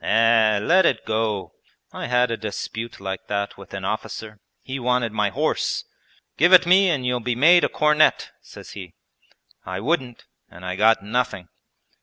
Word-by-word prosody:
'Eh, 115 Hz, -1 st, +3 dB
let 175 Hz, -, +3 dB
it -, -, 0 dB
go! 110 Hz, -3 st, -2 dB, 0.4 s
I -, -, -6 dB
had 125 Hz, 0 st, +1 dB
a -, -, -1 dB
dispute 110 Hz, +2 st, -6 dB
like 95 Hz, -1 st, -6 dB
that 100 Hz, 0 st, -3 dB
with 100 Hz, -1 st, -14 dB
an 95 Hz, -1 st, -6 dB
officer, 110 Hz, +1 st, -5 dB, 0.2 s
he 135 Hz, +1 st, -6 dB
wanted 125 Hz, -2 st, 0 dB
my 105 Hz, -1 st, 0 dB
horse. -, -, -2 dB, 0.5 s
"Give 175 Hz, +4 st, +4 dB
it 180 Hz, -, +8 dB
me 185 Hz, +2 st, +4 dB
and 140 Hz, -7 st, -1 dB
you'll 125 Hz, 0 st, 0 dB
be 120 Hz, 0 st, -2 dB
made 170 Hz, +8 st, +5 dB
a -, -, +2 dB
cornet," 150 Hz, 0 st, +2 dB
says -, -, -13 dB
he. 90 Hz, -4 st, -10 dB, 0.7 s
I 95 Hz, 0 st, -6 dB
wouldn't, 130 Hz, -, -3 dB, 0.2 s
and 90 Hz, +2 st, -13 dB
I 90 Hz, 0 st, -4 dB
got 110 Hz, +1 st, +3 dB
nothing!' 105 Hz, -4 st, -3 dB
115 Hz, 170 wpm, -22 LUFS, 105-125 Hz, 0.7 s, it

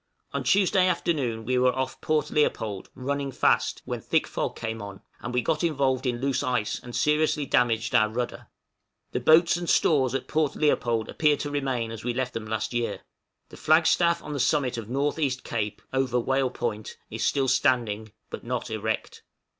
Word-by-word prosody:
On -, -, -2 dB
Tuesday 190 Hz, -1 st, +3 dB
afternoon 140 Hz, -10 st, -1 dB
we 125 Hz, +1 st, +1 dB
were 125 Hz, 0 st, +3 dB
off 130 Hz, 0 st, -3 dB
Port 155 Hz, -1 st, 0 dB
Leopold, 110 Hz, -9 st, 0 dB
running 140 Hz, +1 st, -2 dB
fast, -, -, +1 dB
when -, -, -4 dB
thick -, -, +1 dB
fog -, -, -3 dB
came 110 Hz, 0 st, -4 dB
on, 100 Hz, -1 st, -9 dB, 0.2 s
and 120 Hz, -, -5 dB
we 125 Hz, -1 st, 0 dB
got 155 Hz, +7 st, 0 dB
involved 135 Hz, -5 st, +1 dB
in 120 Hz, -1 st, -1 dB
loose 135 Hz, 0 st, 0 dB
ice, 125 Hz, -6 st, -1 dB
and 120 Hz, -1 st, -9 dB
seriously 150 Hz, -1 st, +2 dB
damaged 115 Hz, -2 st, +1 dB
our 110 Hz, 0 st, +4 dB
rudder. 120 Hz, +2 st, -4 dB, 0.6 s
The -, -, -1 dB
boats 160 Hz, +6 st, +5 dB
and 175 Hz, -1 st, -4 dB
stores 135 Hz, -5 st, +3 dB
at -, -, -3 dB
Port 155 Hz, -2 st, 0 dB
Leopold 120 Hz, -7 st, +1 dB
appeared 150 Hz, -2 st, +2 dB
to 145 Hz, -, -4 dB
remain 130 Hz, -5 st, -1 dB
as 115 Hz, -1 st, -7 dB
we 120 Hz, 0 st, -2 dB
left 130 Hz, -1 st, -2 dB
them 110 Hz, -1 st, -5 dB
last 110 Hz, +2 st, -2 dB
year. 120 Hz, -1 st, -2 dB, 0.5 s
The -, -, -12 dB
flag 160 Hz, +1 st, +4 dB
staff 170 Hz, 0 st, +3 dB
on 150 Hz, -, -6 dB
the 145 Hz, -, -3 dB
summit 135 Hz, -1 st, +1 dB
of 115 Hz, -2 st, -6 dB
North 140 Hz, +5 st, -1 dB
east 130 Hz, -4 st, -1 dB
Cape 105 Hz, -3 st, -3 dB
(over 130 Hz, -2 st, +1 dB
Whale 135 Hz, +2 st, +1 dB
Point) 110 Hz, -4 st, -4 dB
is -, -, -3 dB
still 135 Hz, -1 st, +1 dB
standing, 110 Hz, -5 st, +1 dB, 0.2 s
but -, -, -6 dB
not -, -, -3 dB
erect. -, -, -3 dB
130 Hz, 190 wpm, -26 LUFS, 120-150 Hz, 0.6 s, boats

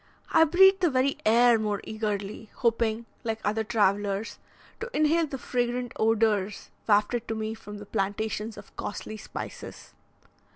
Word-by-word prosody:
I 320 Hz, -, +6 dB
breathed 385 Hz, +4 st, +6 dB
the 350 Hz, -, +4 dB
very 265 Hz, 0 st, +1 dB
air 235 Hz, +1 st, +5 dB
more 210 Hz, -2 st, -1 dB
eagerly, 210 Hz, -1 st, -4 dB
hoping, 230 Hz, -1 st, 0 dB, 0.2 s
like 225 Hz, -1 st, -2 dB
other 215 Hz, +2 st, +1 dB
travellers, 205 Hz, -1 st, 0 dB, 0.4 s
to 470 Hz, -, -5 dB
inhale 310 Hz, +2 st, +3 dB
the 275 Hz, -, -5 dB
fragrant 245 Hz, -1 st, -2 dB
odours 215 Hz, -2 st, +1 dB, 0.2 s
wafted 220 Hz, +3 st, +2 dB
to 225 Hz, -, -2 dB
me 220 Hz, 0 st, -3 dB
from 210 Hz, -2 st, -10 dB
the 205 Hz, -, -9 dB
plantations 210 Hz, +2 st, -2 dB
of 205 Hz, -, -13 dB
costly 215 Hz, +1 st, -5 dB
spices. -, -, -8 dB
220 Hz, 140 wpm, -27 LUFS, 210-245 Hz, 0.4 s, I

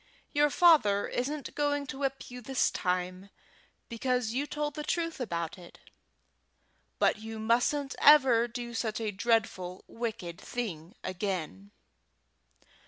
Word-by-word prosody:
Your 295 Hz, 0 st, +4 dB
father 280 Hz, -, +5 dB
isn't 280 Hz, +4 st, -3 dB
going 290 Hz, -1 st, 0 dB
to 270 Hz, 0 st, -7 dB
whip 270 Hz, -2 st, -3 dB
you 250 Hz, 0 st, -8 dB
this 265 Hz, +2 st, +1 dB
time, 185 Hz, +1 st, -2 dB, 0.6 s
because 250 Hz, -1 st, -1 dB
you 280 Hz, +4 st, -1 dB
told 295 Hz, 0 st, -3 dB
the 300 Hz, -, -5 dB
truth 330 Hz, 0 st, -2 dB
about 170 Hz, -7 st, -3 dB
it, 175 Hz, -, -13 dB, 1.2 s
but -, -, +2 dB
you 220 Hz, 0 st, -7 dB
mustn't 245 Hz, +5 st, +1 dB
ever 260 Hz, -6 st, +6 dB
do 240 Hz, 0 st, -6 dB
such 225 Hz, -1 st, -2 dB
a 220 Hz, -2 st, -2 dB
dreadful 195 Hz, -4 st, 0 dB
wicked 220 Hz, -7 st, -5 dB
thing 190 Hz, -6 st, -5 dB
again." 185 Hz, 0 st, -4 dB
235 Hz, 125 wpm, -30 LUFS, 200-275 Hz, 1.2 s, ever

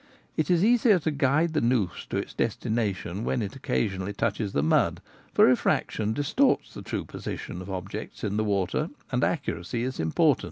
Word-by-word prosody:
It 155 Hz, -, 0 dB
is 175 Hz, +2 st, +4 dB
easier 235 Hz, -3 st, +5 dB
to 160 Hz, -2 st, -1 dB
guide 145 Hz, +4 st, +2 dB
the 150 Hz, -, +1 dB
noose 115 Hz, -7 st, 0 dB
to -, -, -1 dB
its -, -, -4 dB
destination 105 Hz, -3 st, -1 dB
when 120 Hz, -, 0 dB
it 100 Hz, -, -5 dB
occasionally 100 Hz, -6 st, -1 dB
touches 105 Hz, -1 st, -1 dB
the 70 Hz, -, +1 dB
mud, 80 Hz, -, +2 dB, 0.3 s
for -, -, +6 dB
refraction 110 Hz, 0 st, +2 dB
distorts 160 Hz, -, +1 dB
the -, -, -7 dB
true -, -, -4 dB
posi -, -, -5 dB
tion 90 Hz, -, -7 dB
of 95 Hz, -, -8 dB
objects 95 Hz, -2 st, -6 dB
in 100 Hz, 0 st, -1 dB
water, 100 Hz, -3 st, 0 dB, 0.2 s
and -, -, +1 dB
accuracy 90 Hz, +8 st, -1 dB
is 130 Hz, +1 st, -3 dB
important. 80 Hz, 0 st, +3 dB
110 Hz, 175 wpm, -27 LUFS, 95-145 Hz, 0.3 s, for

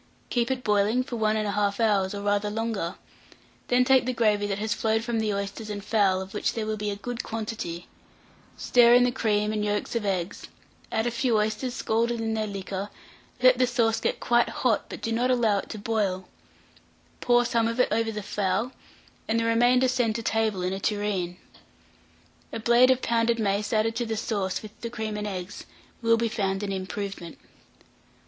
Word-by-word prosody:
Keep 240 Hz, 0 st, +1 dB
it 260 Hz, -1 st, -2 dB
boiling 210 Hz, +4 st, +2 dB
for 255 Hz, -2 st, -6 dB
1 215 Hz, -1 st, +1 dB
1/2 205 Hz, -1 st, 0 dB
hour, 205 Hz, -4 st, +2 dB
or 200 Hz, 0 st, -5 dB
rather 205 Hz, 0 st, +1 dB
longer; 215 Hz, -5 st, -2 dB, 0.7 s
then 250 Hz, 0 st, +3 dB
take 260 Hz, -1 st, +4 dB
the 255 Hz, -, 0 dB
gravy 210 Hz, -3 st, +2 dB
that 195 Hz, -1 st, -2 dB
has 215 Hz, +1 st, -1 dB
flowed 225 Hz, -1 st, 0 dB
from 235 Hz, -1 st, -1 dB
the 215 Hz, -1 st, 0 dB
oysters 200 Hz, +2 st, -4 dB
and 205 Hz, -1 st, -5 dB
fowl, 195 Hz, -4 st, +2 dB
of 190 Hz, 0 st, -9 dB
which 210 Hz, -, -1 dB
there 225 Hz, -2 st, -2 dB
will 215 Hz, 0 st, -1 dB
be 210 Hz, 0 st, -3 dB
a 200 Hz, -, -2 dB
good 240 Hz, +4 st, -5 dB
quantity; 215 Hz, -6 st, -5 dB, 0.7 s
stir 240 Hz, -1 st, +5 dB
in 245 Hz, -, +6 dB
the 245 Hz, -, +2 dB
cream 215 Hz, -3 st, 0 dB
and 210 Hz, -1 st, -1 dB
yolks 210 Hz, +2 st, -2 dB
of 230 Hz, -, 0 dB
eggs, 185 Hz, -3 st, -2 dB, 0.4 s
add 220 Hz, 0 st, 0 dB
a 240 Hz, -, 0 dB
few 235 Hz, -1 st, +1 dB
oysters 220 Hz, +4 st, -1 dB
scalded 235 Hz, +1 st, 0 dB
in 225 Hz, 0 st, -1 dB
their 215 Hz, -1 st, -1 dB
liquor; 195 Hz, 0 st, -5 dB, 0.5 s
let 255 Hz, -1 st, +6 dB
the 255 Hz, -, +4 dB
sauce 230 Hz, -3 st, +1 dB
get -, -, -1 dB
quite 240 Hz, 0 st, +2 dB
hot, 235 Hz, -5 st, 0 dB
but -, -, -8 dB
do 225 Hz, -, -1 dB
not 240 Hz, +3 st, +1 dB
allow 230 Hz, -5 st, +3 dB
it -, -, -8 dB
to 220 Hz, -, -6 dB
boil; 200 Hz, -4 st, -1 dB, 0.9 s
pour 245 Hz, 0 st, +3 dB
some 230 Hz, -1 st, +1 dB
of 230 Hz, +2 st, -3 dB
it 250 Hz, -, +4 dB
over 225 Hz, +1 st, +1 dB
the 210 Hz, -1 st, -5 dB
fowl, 210 Hz, +5 st, -1 dB, 0.6 s
and 225 Hz, +1 st, +1 dB
the 230 Hz, -, 0 dB
remainder 245 Hz, +3 st, +4 dB
send 245 Hz, -4 st, +1 dB
to 230 Hz, -, -3 dB
table 220 Hz, -4 st, 0 dB
in 180 Hz, +1 st, -1 dB
a 195 Hz, -, -3 dB
tureen. 200 Hz, -4 st, -1 dB, 1.1 s
A -, -, -4 dB
blade 240 Hz, +3 st, +5 dB
of 260 Hz, 0 st, +2 dB
pounded 230 Hz, 0 st, +2 dB
mace 205 Hz, -1 st, 0 dB
added 225 Hz, 0 st, +1 dB
to 240 Hz, -1 st, -1 dB
the 220 Hz, -1 st, -2 dB
sauce, 200 Hz, -3 st, -2 dB
with 215 Hz, -, -9 dB
the 235 Hz, -, -4 dB
cream 220 Hz, -2 st, -4 dB
and 210 Hz, 0 st, -3 dB
eggs, 185 Hz, -1 st, -6 dB, 0.3 s
will 230 Hz, -1 st, +4 dB
be 230 Hz, 0 st, +1 dB
found 195 Hz, -3 st, -1 dB
an 200 Hz, -, -2 dB
improvement. 190 Hz, -2 st, -5 dB
220 Hz, 200 wpm, -26 LUFS, 205-235 Hz, 1.1 s, in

